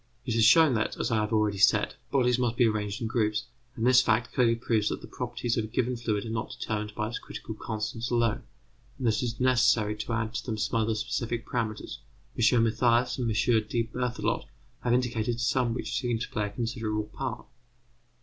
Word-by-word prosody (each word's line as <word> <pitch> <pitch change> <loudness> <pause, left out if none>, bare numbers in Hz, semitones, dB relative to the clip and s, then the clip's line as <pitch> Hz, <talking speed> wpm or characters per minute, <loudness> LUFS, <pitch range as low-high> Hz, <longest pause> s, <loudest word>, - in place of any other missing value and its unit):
It 120 - -1
has 115 0 +3
shown 155 +5 +7
that, 110 - -1
as - - -1
I 115 - +2
have 105 0 -1
already 105 -3 +1
said, 105 - +4 0.2
bodies 125 -2 +2
must 120 -2 0
be 120 - +5
arranged 105 -1 -1
in - - 0
groups, 110 -2 0 0.3
and 115 - -2
this 130 0 +7
fact 115 0 +1
clearly 120 -2 +3
proves 115 -2 0
that - - -3
the - - -11
properties 120 -1 -3
of 110 - 0
a - - -7
given 125 +2 -1
fluid 110 -3 -2
are 110 - -5
not 110 -1 -4
determined 105 -1 -3
by 105 0 -2
its 115 - -4
critical 110 - -8
constants 110 +2 -4
alone, 115 -2 +1 0.6
and 130 - -4
that 110 -2 +3
it - - -1
is 120 -2 -3
necessary 120 -4 +3
to 115 - -4
add 115 0 -1
to - - -3
them 110 -3 -3
some 115 +2 0
other 110 0 0
specific 115 +1 -2
parameters; 110 -3 -3 0.4
M. 115 0 +4
Mathias 120 +2 +2
and 120 -2 0
M. 110 +1 +2
D. 115 - +1
Berthelot 125 +2 -2 0.4
have 120 - +1
indicated 120 -1 0
some 120 0 +1
which - - -4
seem 120 -3 -1
to 115 - -5
play 105 -2 -1
a - - -5
considerable 110 0 -2
part. 120 +5 -5
115 Hz, 210 wpm, -28 LUFS, 110-120 Hz, 0.6 s, shown